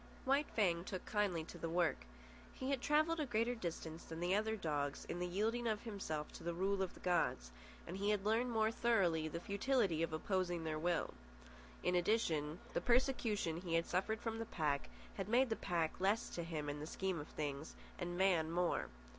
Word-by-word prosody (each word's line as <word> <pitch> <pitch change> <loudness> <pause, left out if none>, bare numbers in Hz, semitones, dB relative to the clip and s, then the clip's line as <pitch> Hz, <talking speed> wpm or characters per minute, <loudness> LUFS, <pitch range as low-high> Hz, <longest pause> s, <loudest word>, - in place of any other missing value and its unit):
White 275 +3 +3
Fang 175 -6 +3
took 185 -1 -5
kindly 200 -6 +1
to - - -10
the 165 - -2
work. 165 - +1 0.5
He 260 +1 -2
had 270 -3 0
travelled 310 +4 +3
a 305 - +1
greater 235 +1 +1
distance 170 -6 -5
than 165 0 -7
the 175 +2 +1
other 220 +2 +2
dogs 145 -7 -2
in 175 - -4
the 180 - -1
yielding 225 +6 0
of 215 -2 0
himself 190 -9 -4
to - - -10
the 170 0 -2
rule 195 +2 +1
of 190 - -2
the - - -12
gods, 165 - +1 0.3
and 175 - -5
he 200 +2 0
had 205 -2 +1
learned 225 +4 +2
more 220 -1 +2
thoroughly 180 -10 +2
the 170 +2 -4
futility 200 - +1
of 165 - 0
opposing 175 +1 0
their 155 -1 -2
will. 175 +1 0 0.7
In 180 - +2
addition, 170 -5 +2 0.2
the - - +1
persecution 235 -9 +2
he 170 -3 -1
had 165 0 +3
suffered 220 +5 0
from 225 -1 -2
the 225 - -2
pack 150 -8 0 0.3
had 195 0 -3
made 245 +1 +4
the - - +3
pack 170 -6 -1
less 200 +5 +2
to 175 - -4
him 160 -3 -3
in 145 0 -3
the 150 - -5
scheme 190 0 -1
of 145 - -6
things, 145 0 -4 0.2
and 175 -1 -3
man 180 -4 +3
more. 175 +1 +1
180 Hz, 205 wpm, -38 LUFS, 165-220 Hz, 0.7 s, made